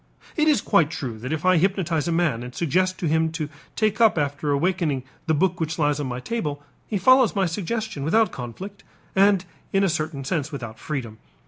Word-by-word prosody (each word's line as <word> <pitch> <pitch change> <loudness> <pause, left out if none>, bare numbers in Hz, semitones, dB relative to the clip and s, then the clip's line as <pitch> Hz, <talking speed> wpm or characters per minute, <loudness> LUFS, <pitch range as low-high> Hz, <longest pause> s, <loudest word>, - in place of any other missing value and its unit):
It 310 -1 +2
is 290 -9 +4
quite 155 -3 +3
true 125 -8 -5
that 130 +5 -5
if 160 +2 -2
I 185 -1 +5
hypnotize 170 -4 +1
a - - 0
man 165 -8 +1
and 125 0 -8
suggest 185 +3 +1
to 175 - -2
him 160 +1 +2
to 155 -3 -3 0.3
take 215 +1 +1
up 220 -6 +5
after 145 0 -1
awaking 150 -2 0 0.2
the 160 - +3
book 180 +3 +1
which 160 -1 -2
lies 150 -2 +1
on 145 - -2
my 125 0 -4
table, 150 - -3 0.2
he 210 - -1
follows 255 +4 +5
my 195 -1 +2
suggestion 205 -1 -3
without 220 +9 +3
conflict 185 - -8 0.3
and 195 -1 +4 0.3
in 195 0 +2
a 195 - +3
certain 155 -3 -2
sense 150 +1 -2
without 120 -6 -7
freedom. 120 -8 -5
160 Hz, 205 wpm, -24 LUFS, 145-195 Hz, 0.3 s, I